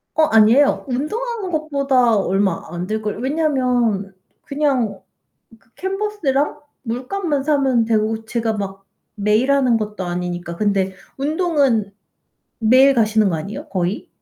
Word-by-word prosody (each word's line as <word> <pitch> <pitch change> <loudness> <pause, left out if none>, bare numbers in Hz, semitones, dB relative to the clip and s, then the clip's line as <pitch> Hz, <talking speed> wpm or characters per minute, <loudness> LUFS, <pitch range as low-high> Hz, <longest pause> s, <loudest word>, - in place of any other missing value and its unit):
어 315 - +4
아니에요. 230 +4 +4
운동하는 400 - -3
것보다 275 -6 +2
얼마 195 -2 0
안 175 +1 -4
들걸 215 0 -3
왜냐면 250 -9 0 0.3
그냥 265 -9 -1 0.6
그 225 - -33
캔버스랑 380 -8 -1 0.2
물감만 275 +5 -2
사면 270 -6 +2
되고 220 0 0
제가 225 -1 -2
막 195 -1 -5 0.3
매일 215 +6 +2
하는 255 -4 +3
것도 210 -3 -4
아니니까. 175 -1 -4
근데 195 -2 0 0.2
운동은 280 - +1 0.7
매일 255 +5 +5
가시는 215 -3 +3
거 170 - -1
아니에요, 180 +7 -7
거의? 185 +1 -2
235 Hz, 270 characters per minute, -20 LUFS, 205-280 Hz, 0.7 s, 매일